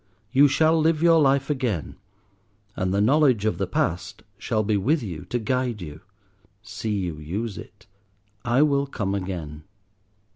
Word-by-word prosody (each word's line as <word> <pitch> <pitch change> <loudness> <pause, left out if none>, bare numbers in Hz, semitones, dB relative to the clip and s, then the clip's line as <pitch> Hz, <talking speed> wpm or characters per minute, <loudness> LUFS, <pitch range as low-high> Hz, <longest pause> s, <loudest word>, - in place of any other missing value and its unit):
You 140 +2 +6
shall 160 +3 +3
live 160 0 +1
your 165 -2 +5
life 140 0 +2
again, 120 - -2 0.8
and 90 0 -1
the 100 +1 +1
knowledge 130 -2 +3
of 110 - 0
the 95 - -1
past 90 -1 -2 0.2
shall 110 - -1
be 105 0 0
with 135 - +1
you 85 -7 -6
to 120 - -2
guide 125 0 -1
you. 75 -3 -9 0.6
See 105 -1 -4
you 85 -5 -4
use 100 +8 -4
it. - - -12 0.6
I 125 +4 +3
will 140 -2 +1
come 100 -7 -3
again." 85 -6 -5
110 Hz, 155 wpm, -24 LUFS, 95-140 Hz, 0.8 s, You